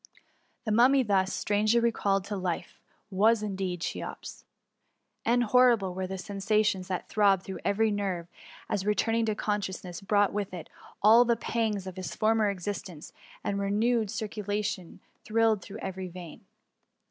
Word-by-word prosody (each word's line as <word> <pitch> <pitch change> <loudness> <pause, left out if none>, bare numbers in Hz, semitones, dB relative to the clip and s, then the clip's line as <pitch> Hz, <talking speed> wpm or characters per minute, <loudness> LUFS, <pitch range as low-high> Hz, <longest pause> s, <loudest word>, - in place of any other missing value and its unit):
The 215 - -1
Mummy 255 +5 +5
thus 195 -3 +1
strangely 210 +4 +2
recalled 200 -4 +1
to 205 +1 -5
life, 185 -3 -4 0.3
was 215 +3 +3
indeed 190 -4 -3
Cheops! - - -6 0.8
and 240 +1 +3
horrible 235 -5 +4
were 185 0 -3
the 190 +1 -5
sen 200 +2 -7
THE 195 - -6
MUMMY. 215 0 +5
S51 200 -2 +1
sations 185 - -10
that 185 -2 -3
throbbed 200 -3 +3
through 190 - -6
every 215 +2 +2
nerve 190 -4 -2 0.4
as 205 -3 -1
returning 225 +3 +1
consciouEaiess 195 -3 -3
brought 205 -1 +3
with 200 -2 -3
it 170 - -9 0.3
all 225 +3 +8
the 235 -1 +2
pangs 220 -4 -2
of 185 -1 -8
his 185 -6 -5
former 220 -1 +2
existence, 185 -4 -6 0.3
and 200 0 -1
renewed 215 +3 +1
circu 210 +1 -4
lation 205 -3 -3 0.2
thrilled 220 -2 +2
through 200 +3 -9
every 190 -1 -4
vein. 175 -2 -10
205 Hz, 160 wpm, -28 LUFS, 190-220 Hz, 0.8 s, all